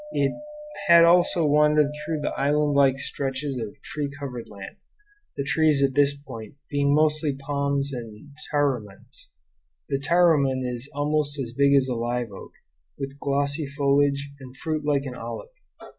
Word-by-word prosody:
It 140 Hz, -, +1 dB, 0.6 s
had 170 Hz, -1 st, +8 dB
also 175 Hz, -1 st, +4 dB
wandered 150 Hz, 0 st, +3 dB
through 150 Hz, +1 st, -4 dB
the -, -, -1 dB
island 145 Hz, +2 st, +1 dB
like 135 Hz, -1 st, +4 dB
stretches 135 Hz, +1 st, -3 dB
of 110 Hz, -, -3 dB, 0.2 s
tree 145 Hz, -2 st, -4 dB
covered 125 Hz, -4 st, -6 dB
land, 100 Hz, -2 st, -10 dB, 0.6 s
the 140 Hz, -, -1 dB
trees 150 Hz, 0 st, +2 dB
at 135 Hz, -1 st, +2 dB
this 140 Hz, 0 st, +2 dB
point 115 Hz, -5 st, -10 dB, 0.2 s
being 140 Hz, 0 st, +2 dB
mostly 155 Hz, -1 st, +1 dB
palms 140 Hz, 0 st, -2 dB
and 115 Hz, +3 st, -9 dB, 0.2 s
tarumans; 130 Hz, -9 st, -3 dB, 0.6 s
the 135 Hz, -, 0 dB
taruman 145 Hz, -4 st, +3 dB
is 125 Hz, +2 st, -5 dB
almost 145 Hz, 0 st, 0 dB
as 120 Hz, -4 st, -4 dB
big 140 Hz, +2 st, +4 dB
as 135 Hz, -1 st, +3 dB
a 125 Hz, -, -1 dB
live 120 Hz, -1 st, -2 dB
oak, 95 Hz, -, -11 dB, 0.4 s
with 140 Hz, 0 st, -6 dB
glossy 140 Hz, +2 st, -1 dB
foliage 140 Hz, 0 st, +1 dB
and 130 Hz, -1 st, -12 dB
a -, -, -19 dB
fruit 155 Hz, 0 st, -3 dB
like 145 Hz, -1 st, +1 dB
an 130 Hz, -, -5 dB
olive. 120 Hz, -, -7 dB
140 Hz, 160 wpm, -25 LUFS, 135-150 Hz, 0.6 s, had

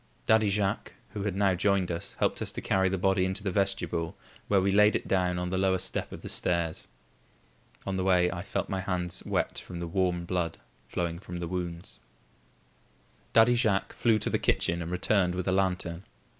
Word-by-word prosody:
Daddy 110 Hz, -1 st, +4 dB
Jacques, 100 Hz, 0 st, -1 dB, 0.2 s
who 105 Hz, -, -6 dB
had 100 Hz, -3 st, -1 dB
now 100 Hz, -1 st, +3 dB
joined 95 Hz, 0 st, +1 dB
us, 85 Hz, 0 st, -4 dB
helped -, -, 0 dB
us -, -, -1 dB
to -, -, -4 dB
carry 95 Hz, 0 st, +2 dB
the 95 Hz, -, -1 dB
body 95 Hz, 0 st, +2 dB
into 95 Hz, +2 st, -1 dB
the 100 Hz, -, -1 dB
vestibule, 95 Hz, -2 st, -1 dB, 0.3 s
where 100 Hz, -, +4 dB
we 95 Hz, +1 st, +2 dB
laid 105 Hz, +2 st, +5 dB
it -, -, -2 dB
down 90 Hz, -2 st, +1 dB
on 90 Hz, 0 st, -2 dB
the 95 Hz, -, 0 dB
lower 95 Hz, -1 st, +3 dB
step -, -, -3 dB
of -, -, -9 dB
the -, -, -6 dB
stairs. 85 Hz, -2 st, 0 dB, 1.0 s
On 95 Hz, -1 st, -2 dB
the 95 Hz, -, 0 dB
way, 90 Hz, -2 st, +4 dB
I 90 Hz, -, -5 dB
had 90 Hz, -, -7 dB
felt -, -, -2 dB
my 95 Hz, -, -2 dB
hands 90 Hz, -2 st, -3 dB
wet -, -, -1 dB
from 90 Hz, -, -8 dB
the 85 Hz, -, -3 dB
warm 90 Hz, 0 st, 0 dB
blood 85 Hz, -2 st, -1 dB, 0.3 s
flowing 85 Hz, -1 st, -2 dB
from 90 Hz, -2 st, -7 dB
the 85 Hz, -1 st, -4 dB
wounds. 85 Hz, -1 st, -5 dB, 1.3 s
Daddy 115 Hz, +2 st, +6 dB
Jacques 110 Hz, -5 st, +1 dB
flew 115 Hz, -2 st, +3 dB
to -, -, -1 dB
the -, -, +1 dB
kitchen 85 Hz, +1 st, +1 dB
and 85 Hz, -, -4 dB
returned 90 Hz, 0 st, +1 dB
with 90 Hz, -1 st, -3 dB
a -, -, +3 dB
lantern. 90 Hz, -2 st, 0 dB
95 Hz, 205 wpm, -29 LUFS, 90-100 Hz, 1.3 s, Daddy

